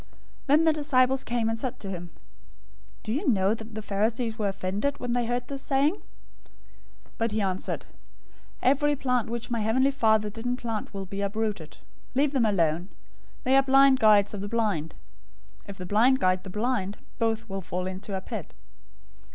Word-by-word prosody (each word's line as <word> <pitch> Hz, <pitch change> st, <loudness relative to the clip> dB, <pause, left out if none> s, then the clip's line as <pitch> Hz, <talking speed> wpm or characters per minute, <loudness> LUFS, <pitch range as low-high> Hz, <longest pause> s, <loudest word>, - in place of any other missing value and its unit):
015:012 -, -, -26 dB, 0.4 s
Then 295 Hz, +3 st, +5 dB
the 320 Hz, -1 st, +4 dB
disciples 265 Hz, -3 st, +2 dB
came, 235 Hz, -2 st, -1 dB
and 225 Hz, 0 st, -1 dB
said 255 Hz, +1 st, -4 dB
to 195 Hz, -2 st, -6 dB
him, 175 Hz, -1 st, -6 dB, 0.9 s
"Do 215 Hz, -, -2 dB
you 295 Hz, +7 st, 0 dB
know 195 Hz, -3 st, +3 dB
that 225 Hz, -1 st, -8 dB
the 220 Hz, -, -5 dB
Pharisees 220 Hz, +3 st, -1 dB
were 210 Hz, -, +1 dB
offended, 200 Hz, +8 st, -2 dB
when 245 Hz, -1 st, -2 dB
they 240 Hz, -1 st, 0 dB
heard 245 Hz, 0 st, -2 dB
this 275 Hz, -1 st, -5 dB
saying?" 280 Hz, +4 st, +2 dB
015:013 410 Hz, -, -14 dB, 1.2 s
But 230 Hz, -1 st, +1 dB
he 220 Hz, -, 0 dB
answered, 190 Hz, -2 st, -2 dB, 0.8 s
"Every 290 Hz, +3 st, +3 dB
plant 250 Hz, -4 st, 0 dB
which 235 Hz, +1 st, -4 dB
my 235 Hz, -, 0 dB
heavenly 250 Hz, +6 st, +2 dB
Father 220 Hz, -5 st, +2 dB
didn't 245 Hz, +3 st, -3 dB
plant 225 Hz, -3 st, -4 dB
will 195 Hz, -1 st, -5 dB
be 195 Hz, +2 st, -5 dB
uprooted. 200 Hz, -5 st, -2 dB
015:014 -, -, -19 dB, 0.4 s
Leave 280 Hz, +1 st, +3 dB
them 260 Hz, -5 st, +2 dB
alone. 175 Hz, -2 st, +1 dB, 0.5 s
They 260 Hz, +1 st, +3 dB
are 270 Hz, -, +7 dB
blind 270 Hz, 0 st, +5 dB
guides 210 Hz, -2 st, +5 dB
of 200 Hz, -, -5 dB
the 205 Hz, -, -4 dB
blind. 205 Hz, -9 st, -1 dB, 0.7 s
If 200 Hz, -1 st, -8 dB
the 180 Hz, -, -6 dB
blind 235 Hz, +8 st, +4 dB
guide 185 Hz, 0 st, +1 dB
the -, -, -6 dB
blind, 210 Hz, -1 st, -1 dB, 0.2 s
both 225 Hz, 0 st, 0 dB
will 195 Hz, -1 st, -4 dB
fall 180 Hz, 0 st, -4 dB
into 190 Hz, +1 st, -4 dB
a -, -, -5 dB
pit." -, -, -7 dB
225 Hz, 185 wpm, -27 LUFS, 200-255 Hz, 1.2 s, are